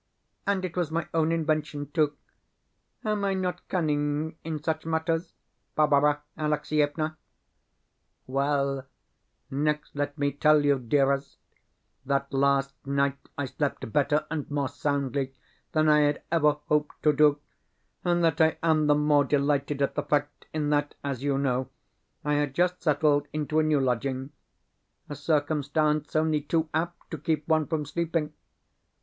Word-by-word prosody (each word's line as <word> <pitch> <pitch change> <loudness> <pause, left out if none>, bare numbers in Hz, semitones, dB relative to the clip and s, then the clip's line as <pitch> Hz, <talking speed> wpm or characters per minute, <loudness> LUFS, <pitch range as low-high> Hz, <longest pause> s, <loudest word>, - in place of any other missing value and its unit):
And 195 -2 +1
it 170 - -6
was 175 -4 0
my 165 +1 -2
own 160 0 +2
invention, 155 -3 -1
too! 150 -2 +1 0.9
Am 210 -1 0
I 195 -1 +1
not 180 -1 -3
cunning 150 -2 0
in 155 -2 -4
such 160 -1 -1
matters, 165 +1 -1 0.4
Barbara 145 -1 +3
Alexievna? 155 0 0 1.1
Well, 140 0 0 0.6
next 150 +2 -1
let 145 +1 -2
me 140 -1 +1
tell 150 +1 +4
you, 140 -2 +3
dearest, 135 +2 +1 0.7
that 140 0 -1
last 140 0 +2
night 140 0 0 0.2
I 145 - -1
slept 135 -4 -3
better 150 +1 +2
and 155 -3 -3
more 145 -2 -1
soundly 140 -2 -2 0.4
than 155 0 +3
I 150 0 +6
had 145 0 +1
ever 150 -3 +4
hoped 150 0 0
to 150 - +5
do, 150 0 +4 0.6
and 175 -1 +2
that 165 -1 +2
I 160 0 +4
am 155 -2 +3
the 145 - +5
more 150 -1 +4
delighted 140 0 +1
at 140 - 0
the - - -1
fact 145 0 -1
in 150 -1 -1
that, 145 0 0
as 140 -3 -3
you 140 -1 +1
know, 130 -2 0 0.6
I 150 - +1
had 145 -2 0
just 180 +1 +1
settled 145 -2 +2
into 155 +1 0
a - - +3
new 155 -2 +3
lodging 130 +1 -1 0.8
a 145 - -6
circumstance 150 0 0
only 155 -1 +2
too 160 +2 0
apt 170 +2 -3
to 160 - -4
keep 155 0 -1
one 155 -2 +2
from 155 -2 -1
sleeping! 165 0 -2
150 Hz, 150 wpm, -27 LUFS, 140-155 Hz, 1.1 s, I